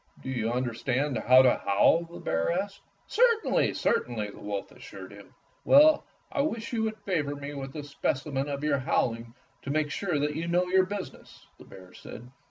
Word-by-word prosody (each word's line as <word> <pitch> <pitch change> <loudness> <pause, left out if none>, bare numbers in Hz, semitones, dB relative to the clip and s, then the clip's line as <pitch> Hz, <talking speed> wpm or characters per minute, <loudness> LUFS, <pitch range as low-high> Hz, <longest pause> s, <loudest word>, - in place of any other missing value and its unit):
"Do 130 - -4
you 115 -3 -1
understand 125 +3 -1
how 130 +1 +6
to 125 - +3
howl?" 130 +12 +3
the 170 +1 -12
bear 80 0 -1
asked. 195 +3 -3 0.2
"Certainly, 465 -1 +2
certainly," 110 -4 -1
the - - -14
wolf 100 -1 -5
assured - - -11
him. - - -15 0.3
"Well, 300 +2 +6 0.3
I 280 - 0
wish 230 -5 -3
you 225 - 0
would 220 0 -2
favor 165 -9 -2
me 145 0 -7
with 135 0 -7
a 150 - -5
specimen 140 0 -2
of 140 0 -4
your 145 -2 +1
howling 115 -2 -1 0.3
to - - -8
make 150 0 0
sure 175 -3 -1
that 150 +1 -1
you 165 +2 -3
know 175 +1 +2
your 185 +1 +3
business," 200 -1 -8
the - - -13
bear 90 -1 -14
said. 120 +2 -11
145 Hz, 185 wpm, -28 LUFS, 125-185 Hz, 0.3 s, how